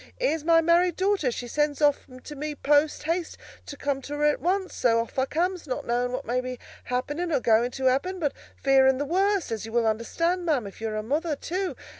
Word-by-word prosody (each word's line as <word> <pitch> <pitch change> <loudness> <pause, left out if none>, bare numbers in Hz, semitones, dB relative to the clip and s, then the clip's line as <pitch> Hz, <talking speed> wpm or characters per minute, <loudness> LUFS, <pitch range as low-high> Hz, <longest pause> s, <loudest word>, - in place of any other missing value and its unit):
Here's 325 -12 0
my 330 0 +5
married 340 +1 +3
daughter, 380 -7 +1
she 245 +1 -5
sends 295 +3 0
off 290 -2 +2 0.2
to 295 - -8
me 300 +1 -4
post 295 +2 +2
haste 335 +2 -2 0.3
to 285 - -8
come 280 -1 -2
to 290 +2 -6
her 295 - -2
at 295 0 +2
once; 375 +2 0
so 230 -2 +2
off 230 +3 -3
I 260 - +3
comes, 355 +2 -1
not 255 - -3
knowing 245 +1 0
what 255 +2 -4
may 250 +2 0
be 255 0 -5 0.3
happening 290 +8 -2
or 295 - +2
going 235 0 +3
to 265 +1 -5
happen, 275 +9 +1
but 300 -6 -1 0.2
fearing 265 -1 +4
the 290 - -2
worst, 385 - +1
as 220 -2 -3
you - - -9
will 235 0 +2
understand, 335 +12 0
ma'am, 295 -9 0
if 200 +2 -10
you're 220 -1 -3
a 215 - -2
mother, 300 +6 -1
too. 365 +5 -3
290 Hz, 225 wpm, -26 LUFS, 250-335 Hz, 0.3 s, my